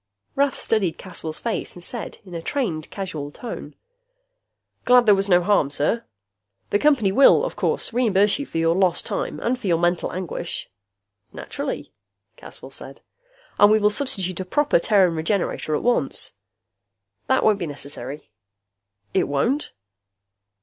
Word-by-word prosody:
Rath 280 0 +1
studied 190 -7 0
Caswell's 165 -4 -6
face 230 -2 -3
and 175 - -9
said, 235 +4 -4
in 180 - -12
a 165 - -4
trained, 175 - -2
casual 170 -8 -5
tone, 235 +9 -8 1.1
"Glad 250 0 +5
there 210 - +7
was 195 0 +1
no 175 -1 +5
harm, 180 -7 +3
sir. 150 +11 0 0.7
The 205 - +3
Company 255 -9 +3
will, 270 - +6
of - - -5
course, - - -1
reimburse 210 -2 +3
you 285 - -4
for - - -5
your 165 0 +3
lost 185 -2 +2
time - - -3
and 245 +2 0
for 210 - -5
your 170 -2 +3
mental 175 +1 0
anguish 175 - -5 0.3
" - - -60 0.3
"Naturally," - - -5 0.4
Caswell - - -12
said. 135 0 -7 0.3
" - - -31
and 205 0 +7
we 215 - +6
will 210 -1 +3
substitute 195 -7 -2
a - - -2
proper 290 +5 +2
Terran 190 -2 +3
Regenerator 160 -2 -1
at - - -2
once." 245 0 +1 1.0
"That 260 - +2
won't 210 -2 +3
be 175 - -3
necessary." 140 -2 -7 0.8
"It - - +2
won't?" 240 - 0
195 Hz, 155 wpm, -23 LUFS, 165-235 Hz, 1.1 s, there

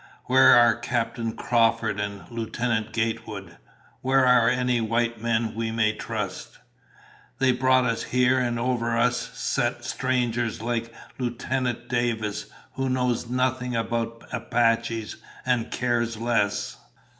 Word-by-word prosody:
Where 130 +1 +7
are 120 -1 +6
Captain 115 -1 -2
Crawford 115 -3 +1
and 100 -1 -4
Lieutenant 115 -1 -2
Gatewood? 115 -3 -3 0.4
Where 130 0 +3
are 125 -2 +5
any 125 -1 +1
white 115 0 0
men 115 -1 0
we 115 0 -2
may 110 -1 +1
trust? 105 -4 -5 0.8
They 130 -1 +3
brought 130 0 +3
us 115 -1 -1
here 125 +1 +3
and 120 -2 0
over 115 -1 0
us 125 +1 +3 0.2
set - - -1
strangers 120 -3 -1
like 115 0 -2 0.3
Lieutenant 125 0 -2
Davis, 115 -4 -1 0.3
who 135 0 -2
knows 125 -2 0
nothing 125 0 0
about 115 0 -2
Apaches 115 -2 0 0.3
and 125 -3 +1
cares 120 -2 -1
less." 105 -3 0
115 Hz, 120 wpm, -25 LUFS, 115-125 Hz, 0.8 s, Where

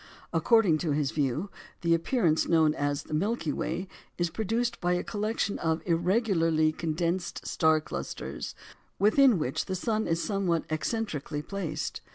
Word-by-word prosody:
According 215 -10 +4
to 155 -3 0
his 145 -2 0
view, 150 +6 -1 0.3
the 170 -2 +3
appearance 165 - +2
known 160 -2 +4
as 145 -1 -1
the - - -9
Milky 165 -2 0
Way 175 +4 -3 0.3
is 175 -1 0
produced 225 +4 -1
by 175 0 +2
a 180 - 0
collection 210 -1 -2
of 160 0 0
irregularly 170 -3 +2
condensed 170 +3 -2
star 160 -1 +3
clusters, 70 - -6 0.4
within 220 +3 +5
which 135 -5 -1
the 190 - -3
sun 220 +3 -1
is 165 0 +1
somewhat 190 -5 0
eccentrically 155 -2 -2
placed. 165 -6 -4
170 Hz, 145 wpm, -28 LUFS, 155-205 Hz, 0.4 s, within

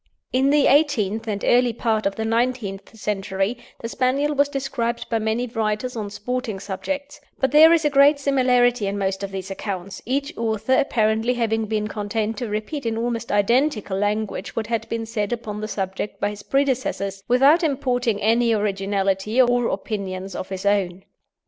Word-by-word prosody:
In 265 +2 +3
the 290 -1 +4
eighteenth 225 -7 +2
and 205 -2 -3
early 245 -1 +4
part 220 -2 0
of 195 - -3
the 220 - -3
nineteenth 225 -3 -2
century 200 +2 -2 0.2
the 230 - -3
Spaniel 270 +5 0
was 285 0 +2
described 260 -4 -2
by 225 - +2
many 220 +3 -1
writers 225 +1 -2
on 210 -3 -4
sporting 225 0 -4
subjects; 285 +10 -5 0.2
but 265 -1 +1
there 315 +2 +8
is 330 -2 +3
a - - +4
great 280 +1 +6
similarity 250 -5 +2
in 200 +1 -2
most 195 -1 -1
of 200 - -3
these 190 0 -6
accounts, 190 -1 -5
each 280 +4 -2
author 225 +2 -1
apparently 225 -2 +2
having 225 -2 0
been 210 0 -1
content 215 +1 -2
to 240 -3 -4
repeat 225 +6 -3
in 225 0 -1
almost 235 0 -2
identical 215 0 +1
language 205 +2 -2
what 225 - -1
had 230 +1 -3
been 230 0 -2
said 220 -2 -2
upon 215 -3 -4
the 215 - -3
subject 195 0 -4
by 205 - 0
his 205 0 -9
predecessors, 255 -8 -1
without 275 +7 +5
importing 250 - 0
any 230 +2 +3
originality 195 +1 0
or 245 -1 +4
opinions 195 -2 -4
of 185 - -5
his 190 0 -5
own. 190 -2 +1
225 Hz, 175 wpm, -22 LUFS, 205-255 Hz, 0.2 s, there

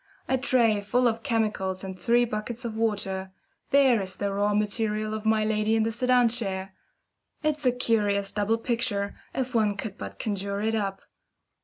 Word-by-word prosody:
A 265 - +2
tray 240 -5 +2
full 245 +5 +2
of 225 -1 -1
chemicals 210 -6 -1
and 190 -1 -5
three 235 +7 +3
buckets 230 +2 -4
of 225 -2 -4
water, 200 -4 -1 0.4
there 265 -5 +5
is 185 -1 -4
the 200 0 -2
raw 205 +1 +1
material 215 +1 0
of 215 0 -3
my 220 -1 +3
lady 215 0 +1
in 220 - +3
the 225 - 0
sedan 250 +1 +3
chair! 195 -5 -3 0.7
It's 300 -3 +1
a - - +6
curious 205 -5 +1
double 210 +2 +1
picture, 225 -4 -1 0.2
if 260 0 -2
one 210 -3 +2
could 210 -1 -6
but - - -7
conjure 200 -1 -2
it 220 +2 0
up. 200 -3 -2
215 Hz, 175 wpm, -27 LUFS, 200-235 Hz, 0.7 s, a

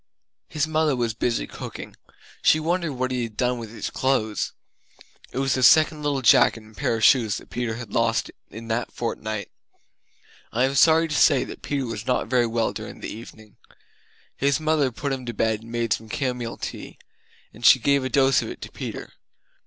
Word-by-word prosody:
His 155 -1 0
mother 155 -2 +1
was 120 -2 -1
busy 115 +2 -1
cooking; - - -9 0.5
she 155 - +4
wondered 170 -1 -1
what 130 0 -2
he 125 -1 -1
had 115 -3 -6
done 125 -1 0
with 115 -2 -7
his 115 - -6
clothes. 110 -5 0 0.8
It - - -7
was 135 0 +1
the 130 - -1
second 155 +3 +5
little 145 -3 -1
jacket 115 -1 +5
and 110 0 -18
pair 115 - 0
of 110 - -3
shoes 110 -6 +4
that - - -13
Peter 120 -2 -2
had 115 -3 -9
lost 115 -1 +1 0.2
in 115 +1 -8
a 120 +1 0
fortnight! 110 -3 -4 1.0
I 125 - +1
am 135 +1 +1
sorry 160 +4 +5
to 155 - -4
say 145 -4 +4
that - - -9
Peter 140 -2 -2
was 115 -1 -6
not 125 - +1
very 125 -2 +3
well 115 0 -1
during - - -8
the - - -5
evening. 110 -1 -13 0.8
His 140 +2 +1
mother 155 -4 +1
put 140 +3 -3
him 130 -1 -5
to 120 - -4
bed 110 0 0
and 115 +1 -12
made 115 -2 0
some 110 0 -6
camomile 125 -5 -3
tea; - - -7 0.6
and 115 - -14
she 125 - +8
gave 140 +3 +2
a 130 - -2
dose 135 0 +3
of - - -5
it - - -8
to - - -9
Peter! - - -7
125 Hz, 200 wpm, -24 LUFS, 115-140 Hz, 1.0 s, she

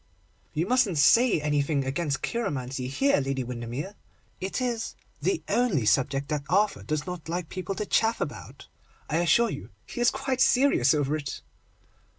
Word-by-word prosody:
'You 160 +3 +1
mustn't 235 -6 +2
say 230 - +5
anything 145 -1 0
against 140 +1 -2
cheiromancy 135 - -2
here, 275 - +2
Lady 135 -1 -2
Windermere; 125 - -5 0.5
it 190 +1 -3
is 240 -3 -2 0.3
the 380 -4 0
only 220 - +1
subject 135 +4 +2
that 150 -2 -1
Arthur 205 +3 +2
does 155 -1 -2
not 180 -3 -6
like 175 -1 -3
people 190 +1 -4
to 210 - -3
chaff 225 +2 +2
about. - - -6 0.4
I 155 - +2
assure 175 +7 +3
you 140 - -7 0.2
he 240 - -6
is 240 - +5
quite 265 -2 -2
serious 245 - +4
over 145 0 0
it. 145 -3 -5
160 Hz, 160 wpm, -27 LUFS, 140-225 Hz, 0.5 s, say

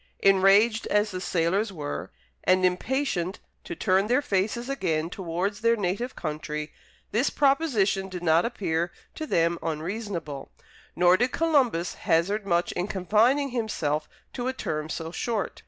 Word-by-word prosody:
Enraged 195 +4 +5
as 210 0 +2
the 185 -1 -5
sailors 185 +4 0
were, 150 -5 -5 0.3
and 185 0 +4
impatient 185 -1 -1 0.2
to - - -6
turn 190 +1 +2
their 250 +4 +3
faces 215 +4 -1
again 170 - -1
towards 190 +3 -3
their 230 0 +4
native 205 +5 -2
country, 150 -1 -4 0.4
this 240 +6 +2
proposition 250 -10 +2
did 180 -1 -6
not 165 0 +4
appear 175 -7 -1 0.2
to 310 - -5
them 170 - +1
unreasonable; 165 -2 -4 0.5
nor 180 +1 +5
did 245 +4 +1
Columbus 265 - +1 0.2
hazard 195 +6 +2
much 175 -1 +1
in 180 +2 -2
confining 220 +9 +2
himself 155 - -2 0.2
to 245 -1 -3
a 260 - 0
term 155 -10 -3
so 165 0 -4
short. 220 +2 -3
190 Hz, 140 wpm, -26 LUFS, 170-230 Hz, 0.5 s, Enraged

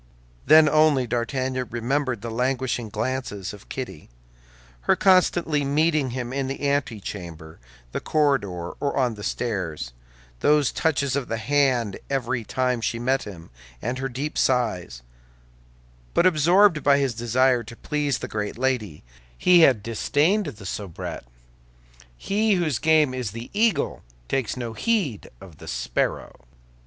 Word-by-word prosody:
Then 155 0 +8
only 155 -3 +4
D'Artagnan 130 +2 -2
remembered 125 0 -1
the 115 - -4
languishing 125 -1 -1
glances 105 -6 -3
of 105 - -14
Kitty, 125 - -7 0.8
her - - +6
constantly 175 -5 +3
meeting 150 0 +1
him 125 0 -4
in 135 -1 -1
the 135 +1 -3
antechamber, 95 - -4 0.3
the - - -2
corridor, 100 - 0
or 140 - -1
on 125 -3 +2
the 105 - -10
stairs, 90 - -3 0.5
those 150 -2 +3
touches 140 -4 0
of 140 -3 -2
the 115 - -2
hand 125 -3 +1
every 130 -3 -1
time 125 +1 -1
she 115 - -1
met 130 +3 0
him, 90 -6 -10 0.3
and 125 +3 -3
her 135 0 -2
deep 140 +5 -3
sighs; 105 - 0 1.1
but - - +4
absorbed 175 +1 +4
by 140 0 +4
his 135 -3 0
desire 120 +2 +2
to 115 +2 -11
please 145 0 -1
the - - -6
great 105 0 -4
lady, 120 - -1 0.3
he 180 -1 +5
had 130 -10 +5
disdained 150 - +1
the 110 -8 -8
soubrette. 95 -8 -6 0.9
He 210 - +1
whose 155 -9 0
game 155 -4 +3
is 125 -4 -3
the 115 +1 -8
eagle 220 +1 +1 0.3
takes 130 - -1
no 120 -2 -4
heed 180 - -1
of 85 -6 -14
the - - -11
sparrow. - - -3
130 Hz, 140 wpm, -24 LUFS, 110-145 Hz, 1.1 s, Then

